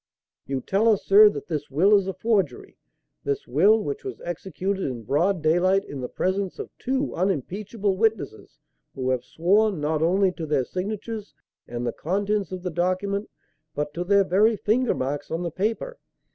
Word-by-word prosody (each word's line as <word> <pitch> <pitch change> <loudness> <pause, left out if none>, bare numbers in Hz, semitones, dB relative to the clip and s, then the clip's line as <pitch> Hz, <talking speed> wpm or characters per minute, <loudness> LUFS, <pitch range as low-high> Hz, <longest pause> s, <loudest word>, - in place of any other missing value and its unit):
You 135 -1 -2
tell 205 - +2
us, 210 -3 +2
sir, 210 +2 +8
that - - -6
this 150 -4 -4
will 185 +10 +4
is 200 -2 +2
a 190 - -2
forgery; 190 - -1 0.5
this 140 0 -2
will, 200 - +4
which 425 +2 -4
was 390 -2 -6
executed 190 +3 -3
in 120 -4 -4
broad 165 - +1
daylight 185 +5 +3
in 140 -2 -7
the 125 - -4
presence 190 0 -1
of - - -8
two 270 +2 -1
unimpeachable 195 - -1
witnesses 210 - -1 0.4
who 130 -1 -1
have 125 -1 -1
sworn, 195 +6 +2
not 150 +1 0
only 185 +3 +3
to 165 -3 -6
their 145 -4 +1
signatures 210 - -5 0.3
and 120 0 -4
the 120 - -1
contents 200 +2 -1
of 185 -1 -6
the 180 - -2
document, 185 +4 -1 0.5
but 150 0 -3
to 175 - -3
their 200 +2 +4
very 205 +5 +3
finger 235 +5 +1
marks 140 +3 -3
on 165 +2 -2
the 170 - -3
paper. 225 - -2
185 Hz, 175 wpm, -25 LUFS, 155-205 Hz, 0.5 s, sir